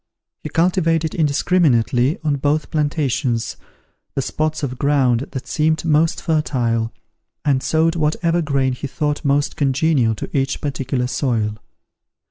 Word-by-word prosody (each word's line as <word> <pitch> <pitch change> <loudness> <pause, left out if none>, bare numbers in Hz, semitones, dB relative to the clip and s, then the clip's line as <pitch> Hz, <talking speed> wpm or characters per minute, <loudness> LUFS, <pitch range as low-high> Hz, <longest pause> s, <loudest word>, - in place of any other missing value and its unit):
He - - -6
cultivated 165 -2 +1
indiscriminately, 145 - +2
on 150 -2 +1
both 145 +3 0
plantations, 145 -6 0 0.6
the 135 - 0
spots 155 +2 -2
of 130 -2 -3
ground 135 -3 +2
that 130 - -5
seemed 155 +1 0
most 160 +1 +2
fertile, 120 -8 0 0.5
and 135 -3 +2
sowed 160 +3 +1
whatever 165 +2 +1
grain 135 -4 0
he 135 +3 -5
thought 150 +3 -2
most 145 0 +1
congenial 135 -4 +2
to - - -7
each 135 -1 0
particular 135 -3 -2
soil. 115 -5 -1
145 Hz, 125 wpm, -20 LUFS, 130-155 Hz, 0.6 s, indiscriminately